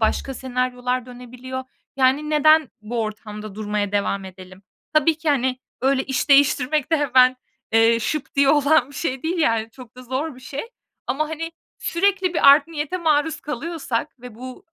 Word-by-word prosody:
başka 260 +4 0
senaryolar 250 -1 -2
dönebiliyor. 250 +1 -8 0.3
Yani 275 +3 +2
neden 310 -1 +5
bu 230 +2 -4
ortamda 215 -1 -7
durmaya 210 -1 -2
devam 200 -1 -1
edelim? 185 0 -12 0.3
Tabii 310 +1 +4
ki, 315 - -3
hani, 260 -3 +1 0.2
öyle 265 0 +1
iş 265 0 -2
değiştirmek 285 +2 +3
de - - +5
hemen, 255 -3 +4 0.4
eee, 225 +1 +4
şıp 270 +6 -3
diye 275 -1 +4
olan 295 -1 +4
bir 285 - -14
şey 265 -4 -3
değil 340 +3 -2
yani 230 -7 +1
çok 250 0 -14
da 255 - -10
zor 260 +4 -3
bir 255 - -15
şey. 270 +2 -6 0.4
Ama, 305 +3 -1
hani, 325 +1 -5 0.3
sürekli 375 0 0
bir 280 - +5
art 285 +1 +6
niyete 310 +2 -3
maruz 315 -2 +1
kalıyorsak 295 -3 -4
ve 245 -3 -10
bu 255 +2 -10
260 Hz, 165 wpm, -22 LUFS, 240-305 Hz, 0.4 s, art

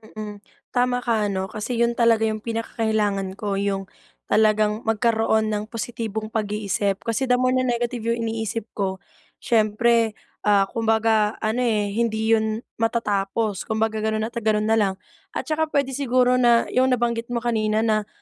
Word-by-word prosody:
Mm, 210 -1 -6 0.3
tama 245 0 +1
ka 225 -4 +1
ano 190 -1 -3
kasi 220 +3 -3
'yon 235 0 +2
talaga 230 -1 +4
'yong 215 -1 0
pinakakailangan 215 -4 -1
ko, 200 -1 -2
'yong 195 -1 -1 0.5
talagang 215 0 +3
magkaroon 220 -1 +2
ng 210 0 -1
positibong 220 -1 -4
pag-iisip. 205 -2 -1
Kasi 230 +3 -1
the 250 - +4
more 255 0 +2
na 255 0 +1
negative 240 0 -1
'yong 230 0 0
iniisip 225 0 -2
ko, 190 -2 -3 0.4
siyempre, 225 -1 +2 0.3
ah, 200 -1 +5
kumbaga 220 -1 +2
ano 220 +3 0
eh, 215 -5 +1
hindi 220 0 0
'yon 220 +1 +1 0.2
matatapos. 210 -2 -1
Kumbaga 220 0 0
gano'n 215 0 -1
at 235 +2 -3
gano'n 215 -1 +1
na 225 - +4
lang 195 -2 +2 0.4
at - - -2
saka 315 0 0
puwede 280 -3 0
siguro 250 -2 +2
na 240 -1 +5
'yong 255 0 +3
nabanggit 235 -1 -1
mo 240 -1 -3
kanina 220 -2 +1
na, 215 -2 +1
220 Hz, 160 wpm, -23 LUFS, 210-235 Hz, 0.5 s, ah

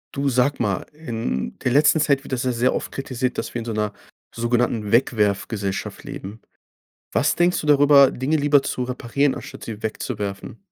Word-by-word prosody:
Du, 140 0 0
sag 130 +2 +1
mal, 105 -5 -1
in 115 - -4
der 125 - +1
letzten 150 +4 +4
Zeit 140 -2 +2
wird 135 - -8
das 125 - -1
ja 130 - +1
sehr 125 +1 +1
oft - - -4
kritisiert, 130 -2 -3
dass - - -4
wir - - 0
in 115 - -6
so 115 - -3
'ner 105 -1 -1 0.4
sogenannten 115 -2 0
Wegwerfgesellschaft 105 -4 0
leben. 100 +4 -8 0.7
Was - - +2
denkst 175 +1 +2
du 150 - -6
darüber, 145 -1 +7
Dinge 140 +5 -1
lieber 145 -1 +3
zu - - -3
reparieren 130 +2 0
anstatt - - -9
sie 110 -2 -7
wegzuwerfen? 105 -3 -4
125 Hz, 180 wpm, -22 LUFS, 110-140 Hz, 0.7 s, darüber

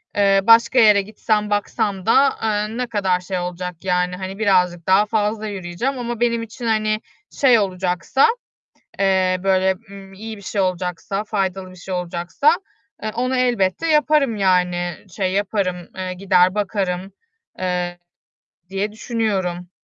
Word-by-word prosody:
eee, 195 -1 +4
başka 230 +4 +5
yere 210 -3 +6
gitsem, 210 +1 -1
baksam 205 -2 -1
da, 270 +5 +5
eee, 215 +1 -1
ne 250 0 -2
kadar 195 -5 0
şey 180 0 -4
olacak. 180 0 -4
Yani, 180 -1 0
hani, 190 +2 -6
birazcık 180 -5 +2
daha 190 +2 +5
fazla 215 0 -1
yürüyeceğim. 200 +7 -3
Ama 240 -1 -4
benim 235 -1 +1
için, 230 +2 -8
hani, 215 -1 +1 0.3
şey 250 -5 +4
olacaksa, 185 - +1 0.7
eee, 190 -1 +2
böyle, 190 0 +2 0.2
ııı, 195 -1 -11
iyi 220 +2 -7
bir - - -13
şey 200 +1 -2
olacaksa, 185 +2 -2
faydalı 190 -3 -2
bir - - -14
şey 185 +1 -7
olacaksa, 180 - +1 0.5
eee, 215 - -2
onu 255 +2 0
elbette 245 - +1
yaparım. 300 -5 +3
Yani, 180 -3 +1 0.2
şey 190 -2 0
yaparım, 200 -2 0 0.2
eee, 185 -1 -3
gider, 185 0 +3
bakarım, 195 -2 -2 0.5
eee, 180 -1 -2 0.7
diye 195 +2 -2
düşünüyorum. 195 -7 -2
195 Hz, 140 wpm, -20 LUFS, 185-220 Hz, 0.7 s, yere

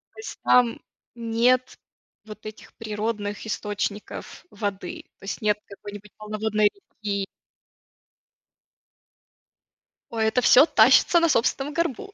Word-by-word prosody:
То - - -13
есть 435 - -8
там 245 -2 +4 0.3
нет 240 +2 +1 0.5
вот 215 0 -11
этих 215 0 -10
природных 210 -1 -4
источников 205 -1 -5
воды, 220 - -5 0.2
то - - -20
есть 200 - -5
нет 210 -1 +2
какой-нибудь 205 0 -11
полноводной 215 0 0
реки. 205 - -5 2.8
Ой, 225 -1 -1
это 220 +3 +2
всё 255 +3 +7
тащится 340 +1 +5
на 335 0 +3
собственном 270 +3 +1
горбу. 335 - -2
220 Hz, 110 wpm, -24 LUFS, 210-250 Hz, 2.8 s, всё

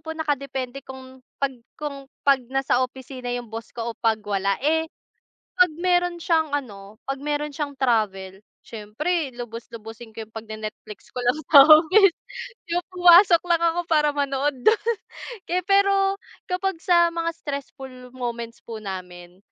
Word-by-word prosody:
po 320 - -6
nakadepende 275 -4 -3
kung 260 0 -11 0.2
pag 275 -1 +1 0.3
kung 280 -2 -6 0.2
pag 275 -1 +4
nasa 270 -1 +1
opisina 255 0 -8
yung 240 -1 -7
boss 225 +1 -6
ko 235 0 -3
o - - -63
pag 225 -1 +2
wala, 200 -1 0
eh 320 +2 +1 0.7
pag 360 -2 +5
meron 355 0 +1
siyang 320 -3 +1
ano 210 -7 -5
pag 270 - -1
meron 295 +1 -2
siyang 285 0 -4
travel, 200 -7 0 0.3
siyempre 270 +9 -3
lubus-lubusin 230 -1 -9
ko 225 - -5
'yung 220 - -31
pag 225 0 -7
ne 215 - -6
Netflix 210 0 -14
ko 250 - -4
lang 245 +4 +2
sa 280 -3 +10
office, 330 +5 +6 0.6
yung 350 +1 0
pumasok 355 0 +7
lang 340 -1 +2
ako 335 +1 +2
para 300 -2 +3
manood 280 0 0
dun. 435 -1 +5 0.7
Eh 365 +1 +1
pero 395 0 +3 0.3
kapag 380 0 -1
sa 345 -1 +4
mga 335 0 -1
stressful 265 -4 -8
moments 235 -2 -5
po 225 -2 -7
namin 180 -2 -8
275 Hz, 155 wpm, -23 LUFS, 230-330 Hz, 0.7 s, sa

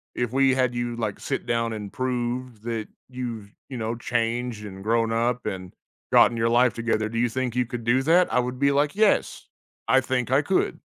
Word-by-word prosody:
if 120 -1 -2
we 135 0 +4
had 130 -2 +1
you 120 0 -2
like 110 -4 -3
sit - - -3
down, 115 -1 0
and 105 -2 -6
prove 125 -2 -3
that 115 -2 -3 0.2
you've 115 -5 -6 0.2
you 130 - -5
know, 115 0 -2
changed 120 -1 -2
and 95 -1 -9
grown 115 +1 +1
up 120 +2 0
and 95 -1 -5 0.4
gotten 120 - +6
your 115 0 +1
life 120 +1 +4
together, 115 -2 -1
"Do 115 +1 -5
you 120 0 +2
think 125 0 -2
you 125 0 +1
could 120 -1 -6
do 130 +3 +3
that?" 175 +5 +4
I - - +4
would 125 0 -3
be 140 0 +3
like, 145 +1 +2
"Yes." 215 0 +1 0.4
I 130 - +5
think 125 -2 -1
I 135 +2 +4
could, 185 +6 0
120 Hz, 210 wpm, -25 LUFS, 115-130 Hz, 0.4 s, gotten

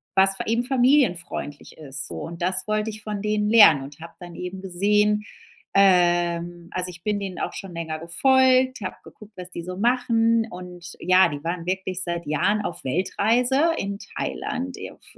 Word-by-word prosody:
was 195 0 +5
fa - - -3
eben 235 +2 +1
familienfreundlich 245 - 0
ist 140 -2 -5
so. - - -8
Und 170 +1 -8
das 185 +2 0
wollte 215 +1 0
ich 215 0 -8
von 210 -2 -4
denen 210 0 0
lernen 185 -12 +7
und 140 +2 -11
habe 170 0 -10
dann 175 -1 -10
eben 180 +1 -6
gesehen, 210 +3 +1 0.5
ähm 175 -2 +2
also, 180 0 -3
ich 175 -1 -12
bin 210 -1 -1
denen 190 -2 -5
auch - - -3
schon 195 -3 -8
länger 160 -2 -4
gefolgt, 260 +7 +3
habe 185 - -5
geguckt 215 0 -15
was 180 0 -8
die 170 - -6
so 180 +1 -7
machen 230 -1 +2
und, 180 -1 -9
ja, 185 +1 +4
die 145 0 -6
waren 170 0 -3
wirklich 185 -1 -2
seit 170 -1 -3
Jahren 190 +8 +1
auf 175 - -5
Weltreise 240 - +1
in 200 +1 -4
Thailand, 265 +1 -5
e - - -7
auf - - -20
190 Hz, 180 wpm, -23 LUFS, 175-215 Hz, 0.5 s, lernen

